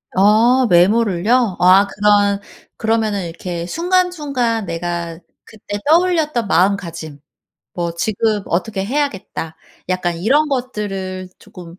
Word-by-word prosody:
아 225 Hz, +6 st, +4 dB
메모를요? 205 Hz, +3 st, +2 dB
아 185 Hz, +3 st, +6 dB
그런 205 Hz, -1 st, +2 dB, 0.4 s
그러면은 220 Hz, -4 st, 0 dB
이렇게 170 Hz, 0 st, -6 dB
순간 360 Hz, -, +1 dB
순간 250 Hz, -, -2 dB
내가 170 Hz, -1 st, -4 dB, 0.2 s
그때 205 Hz, -1 st, -8 dB
떠올렸던 315 Hz, -, +2 dB
마음가짐 170 Hz, -5 st, -1 dB, 0.5 s
뭐 170 Hz, -1 st, -3 dB
'지금 215 Hz, +4 st, -1 dB
어떻게 190 Hz, +3 st, -2 dB
해야겠다.' 210 Hz, -, -3 dB, 0.3 s
약간 175 Hz, -2 st, -1 dB
이런 280 Hz, -, +2 dB
것들을 195 Hz, -8 st, -4 dB
조금 170 Hz, -2 st, -13 dB
205 Hz, 255 characters per minute, -18 LUFS, 180-240 Hz, 0.5 s, 아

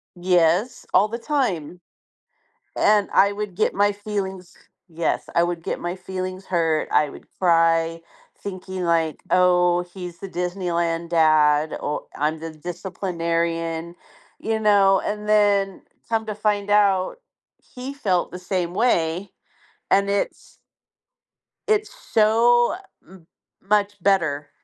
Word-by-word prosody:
Yes, 180 Hz, +6 st, +1 dB
all 210 Hz, -, +5 dB
the 235 Hz, +2 st, -5 dB
time. 180 Hz, -, -2 dB, 1.0 s
And 210 Hz, -1 st, +3 dB
I 200 Hz, +1 st, +5 dB
would 205 Hz, -3 st, -5 dB
get -, -, +1 dB
my 205 Hz, +1 st, +3 dB
feelings 195 Hz, -3 st, -5 dB, 0.4 s
Yes, 165 Hz, 0 st, -2 dB
I 170 Hz, -, +3 dB
would 175 Hz, -1 st, -3 dB
get -, -, -3 dB
my 175 Hz, +1 st, -4 dB
feelings 185 Hz, 0 st, -6 dB
hurt, 165 Hz, -3 st, 0 dB
I 150 Hz, -1 st, +3 dB
would -, -, -13 dB
cry, 165 Hz, -1 st, +2 dB, 0.4 s
thinking, 185 Hz, -1 st, -6 dB
like, 165 Hz, -2 st, 0 dB
"Oh, 180 Hz, -1 st, +4 dB
he's 175 Hz, -1 st, -9 dB
the 195 Hz, -, -7 dB
Disneyland 170 Hz, -2 st, -2 dB
dad. 155 Hz, -2 st, +3 dB
O 150 Hz, -, -4 dB
I'm 155 Hz, +2 st, -1 dB
the 165 Hz, 0 st, -6 dB
disciplinarian," 170 Hz, -1 st, -3 dB, 0.4 s
you 220 Hz, 0 st, -1 dB
know? 200 Hz, -2 st, +4 dB
And 210 Hz, 0 st, -4 dB
then 205 Hz, -2 st, +2 dB, 0.3 s
come 225 Hz, -1 st, 0 dB
to 210 Hz, -, -3 dB
find 205 Hz, -1 st, -1 dB
out, 200 Hz, -, +2 dB, 0.4 s
he 260 Hz, +2 st, -9 dB
felt 190 Hz, -10 st, 0 dB
the 180 Hz, -, -8 dB
same 180 Hz, -1 st, -2 dB
way, 180 Hz, -5 st, +1 dB, 0.6 s
and 200 Hz, 0 st, +3 dB
it's 200 Hz, 0 st, -3 dB, 1.1 s
it's 430 Hz, +2 st, +1 dB
so 240 Hz, -, +3 dB, 0.3 s
m 175 Hz, -3 st, -17 dB, 0.3 s
much 205 Hz, -1 st, 0 dB
better 155 Hz, -7 st, +1 dB
185 Hz, 125 wpm, -23 LUFS, 170-205 Hz, 1.1 s, all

